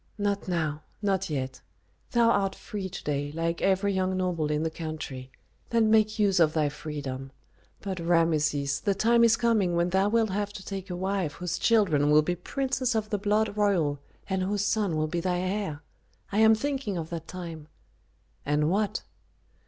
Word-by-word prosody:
"Not 205 -1 -1
now 155 -4 -1 0.2
not 195 -2 0
yet. 130 -3 -3 0.5
Thou 235 -2 +4
art 195 -3 +1
free 195 -3 -6
to 185 - -8
day, 145 -1 -2
like 165 +1 -2
every 195 +1 +2
young 185 0 0
noble 175 -5 -1
in 150 +1 0
the 160 - -1
country; 155 -6 -6 0.4
then 225 -2 +3
make 215 -1 +3
use 200 -3 +3
of 155 -2 +4
thy 155 -2 +2
freedom. 140 -3 -6 0.5
But, 190 -3 -4
Rameses, 155 -4 +1
the 200 -2 0
time 235 +3 +4
is 225 -1 +5
coming 215 -7 +2
when 170 +1 +1
thou 190 +2 +3
wilt 225 -1 +2
have 205 +1 -2
to 190 -2 -9
take 195 -1 -6
a 180 - -3
wife 190 -4 -1
whose 175 -1 -3
children 180 -11 +3
will 150 +1 +6
be 175 +3 -1
princes 260 +5 -1
of 215 0 -1
the 205 - 0
blood 210 +1 +1
royal 180 -9 +1 0.3
and 190 -1 -1
whose 205 +2 0
son 205 -6 +1
will 155 - +1
be 170 +2 -2
thy 180 +1 0
heir. 185 -5 -3 0.5
I 205 - +1
am 220 0 +7
thinking 270 -5 -2
of 165 0 -5
that 165 -1 -5
time 165 -4 -7 0.4
" - - -40
"And 150 +2 +1
what?" 210 +1 0
185 Hz, 185 wpm, -27 LUFS, 155-205 Hz, 0.5 s, am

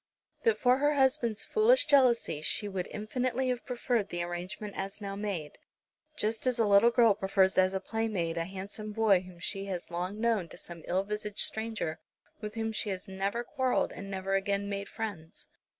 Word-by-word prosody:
But 455 -2 +3
for 250 0 +4
her 290 +1 +3
husband's 260 -5 +2
foolish 475 +3 +4
jealousy 250 - +3
she 205 +6 +2
would 190 -3 -3
infinitely 250 +4 -1
have 250 -1 -3
preferred 240 -4 0
the 175 0 -2
arrangement 185 +4 -5
as 195 +1 -4
now 200 -1 -5
made, 195 -7 -4 0.6
just 220 0 -1
as 250 -1 +2
a 225 - +3
little 205 +3 +6
girl 235 -3 +5
prefers 195 -1 +2
as 185 0 +3
a - - +1
playmate 195 -5 -2
a 165 0 -1
handsome 200 +3 -6
boy 215 -4 +4
whom 180 -1 -13
she 195 +3 -3
has 180 -3 -5
long 180 +4 -3
known, 220 -7 +1
to - - -11
some 170 -1 -7
ill 185 +2 +1
visaged 210 0 -5
stranger 220 -8 -3 0.4
with 210 0 -6
whom 225 0 -1
she 215 -1 -2
has 190 -2 -4
never 195 +5 -2
quarrelled 260 0 0
and 195 - -8
never 195 0 -3
again 200 +1 0
made 200 0 -4
friends. 200 -8 -6
205 Hz, 185 wpm, -30 LUFS, 190-230 Hz, 0.6 s, little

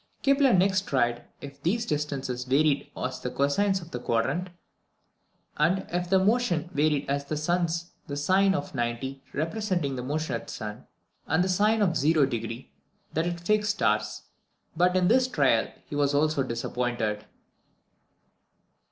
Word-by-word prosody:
Kepler 275 -1 +4
next 190 0 +3
tried 120 -3 0 0.2
if 140 0 -10
these 220 +9 0
distances 140 - -2
varied 140 +3 +2
as 125 0 -3
the 125 - -3
cosines 185 +9 +1
of 165 - -14
the 125 - -4
quadrant, 130 +10 -1 1.1
and 175 +6 +2
if 175 0 -2
their 190 - +5
motion 190 -5 +1
varied 145 0 +1
as 140 0 -1
the 150 +2 -3
sun's, 170 +1 -1 0.2
the 140 - -4
sine 190 +6 +3
of 145 - -4
90 130 +2 -3
representing 165 -3 -1
the - - -3
motion 145 +2 -2
at 115 - -4
the - - -7
sun, 105 -1 -7 0.4
and 160 +4 +2
the - - 0
sine 210 +4 +3
of 195 - +4
0° 135 -7 0 0.5
that 160 +2 0
at 175 -1 -2
the 170 - -15
fixed 210 0 +2
stars; 105 - 0 0.5
but 180 +2 +3
in 180 -1 +3
this 250 +4 +4
trial 135 - +2 0.2
he - - -7
was 145 0 +1
also 155 0 +2
disappointed. 115 -3 -2
150 Hz, 155 wpm, -27 LUFS, 130-185 Hz, 1.1 s, their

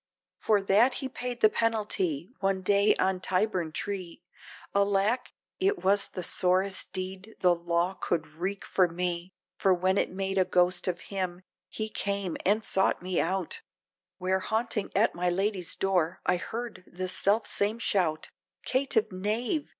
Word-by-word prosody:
For 210 -3 +2
that 220 +7 +4
he 265 - -3
paid 250 -2 -5
the 215 - +7
penalty, 205 -9 0
one 195 -1 0
day 200 +2 +4
on 190 0 +1
Tyburn 185 -3 0
tree, 190 - -4 0.5
Alack! 200 +5 +2 0.3
it 395 +1 +1
was 200 +1 +3
the 180 - -6
sorest 185 +2 +1
deed, 190 +3 -6
the 180 -1 +5
Law 170 +1 0
could 170 -3 -1
wreak 180 +6 -4
for 185 -2 +3
me 175 +1 -3 0.3
For 190 -1 +4
when 185 +2 +2
it - - +1
made 195 +1 -1
a - - +6
Ghost 180 +1 +2
of 180 -1 -1
him, 185 -2 -2 0.3
he 220 - -3
came, 200 -4 -2
and 210 +2 +3
sought 190 -2 +1
me 185 -1 0
out, 185 0 -2 0.6
Where 185 +1 0
haunting 220 +1 -1
at 210 +4 +3
my 180 +1 0
Lady's 190 0 -1
door, 185 -3 +1
I - - +3
heard 230 +2 -6
the 185 +1 -4
self 200 +4 +1
same 205 +3 0
shout, 175 -9 0
Of - - -37 0.3
"Caitiff 255 -5 +1
knave!!" 220 - -1
190 Hz, 160 wpm, -28 LUFS, 180-210 Hz, 0.6 s, the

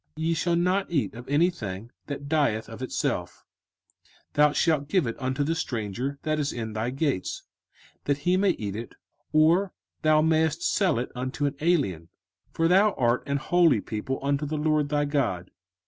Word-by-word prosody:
05:014:021 160 - -4
Ye 165 - +2
shall 170 +1 +1
not 180 +3 +1
eat 145 -10 0
of 120 +3 -10
anything 125 - 0 0.2
that 140 -1 -5
dieth 140 -8 +1
of 115 +1 -10
itself: 130 - -3 0.9
thou 150 0 +5
shalt 150 -2 +1
give 180 +1 +2
it 115 - -3
unto 130 +2 -1
the 160 +3 0
stranger 125 -1 -3
that 155 0 0
is 145 -1 0
in 110 -2 -5
thy 110 +3 -2
gates, 135 - -2 0.6
that 140 -1 +1
he 180 +1 +4
may 195 +1 +3
eat 105 - -2
it; 115 +1 -7 0.4
or 165 +5 +3 0.3
thou 155 -1 +4
mayest 160 +1 +2
sell 195 - +2
it 120 - -3
unto 130 +3 -3
an 140 - 0
alien: 130 - +1 0.4
for 165 - +1
thou 195 +4 +4
art 120 0 +1
an 140 0 0
holy 170 -3 +3
people 110 +6 -4
unto 140 +1 0
the 150 +1 -2
LORD 150 -1 +1
thy 145 0 +1
God. 120 - -1
145 Hz, 180 wpm, -26 LUFS, 120-160 Hz, 0.9 s, thou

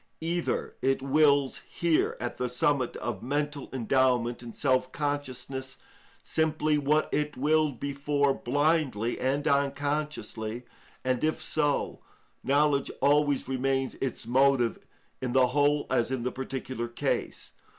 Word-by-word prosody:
Either 170 +1 -2
it 135 0 +1
wills 140 -1 +3
here, 170 -2 +1
at 120 - -4
the 125 - -1
summit 130 +1 +1
of 115 -5 -4
mental 145 +2 -2
endowment 125 -1 +1
and 120 -2 -9
self 130 -2 +1
consciousness, 135 -2 -4 0.5
simply 155 -1 +1
what 150 +1 +2
it 150 -1 -1
willed 150 -1 +2
before 140 0 +1
blindly 140 -5 0
and 140 +4 0
unconsciously, 140 -5 -1 0.4
and 130 -1 0
if 155 0 +1
so, 145 -2 0 0.4
knowledge 140 +1 +2
always 145 -1 +2
remains 135 0 0
its 130 -4 -3
motive 130 -1 +3 0.4
in 125 -2 -2
the 130 -1 +4
whole 145 +2 +2
as 120 -3 +2
in 130 -2 -2
the 125 - -1
particular 130 -2 -4
case. 120 - -3
135 Hz, 125 wpm, -28 LUFS, 125-145 Hz, 0.5 s, the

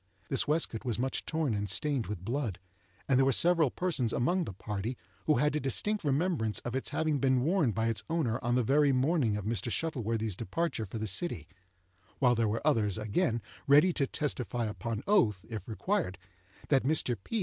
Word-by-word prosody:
This 135 - 0
waistcoat 150 -7 0
was 120 -3 -2
much 130 +2 -2
torn 160 -6 0
and 105 -1 -2
stained 125 +5 +1
with 95 -3 -6
blood, 120 -4 -2 0.5
and 135 -2 +3
there 135 - +5
were 135 - +4
several 165 +1 +3
persons 140 -8 -1
among 175 +8 +1
the - - -6
party 105 +5 -4 0.3
who 150 - +5
had 150 +4 +2
a - - +1
distinct 205 - -1
remembrance 145 - +1
of 120 +1 -4
its 130 - -1
having 155 -3 0
been 130 -1 +3
worn 165 -3 +2
by 110 +2 0
its 110 -4 0
owner 150 -9 0
on 120 0 +1
the 125 - +2
very 140 +4 +4
morning 130 -4 +2
of 105 - -5
Mr. 115 0 -1
Shuttleworthy's 115 - -2
departure 120 - -2
for 105 - -6
the 110 - -3
city; 100 - -1 0.7
while 125 -2 +4
there 115 -1 +1
were 115 +6 -3
others, 110 -10 +2
again, 110 - 0 0.2
ready 150 +6 +6
to 140 -4 +1
testify 125 -5 -2
upon 110 +2 -4
oath, 105 - +2
if 110 -4 -6
required, 160 - -1 0.5
that 135 -2 +4
Mr. 135 -3 +1
P. 230 - -2
125 Hz, 195 wpm, -31 LUFS, 110-150 Hz, 0.7 s, ready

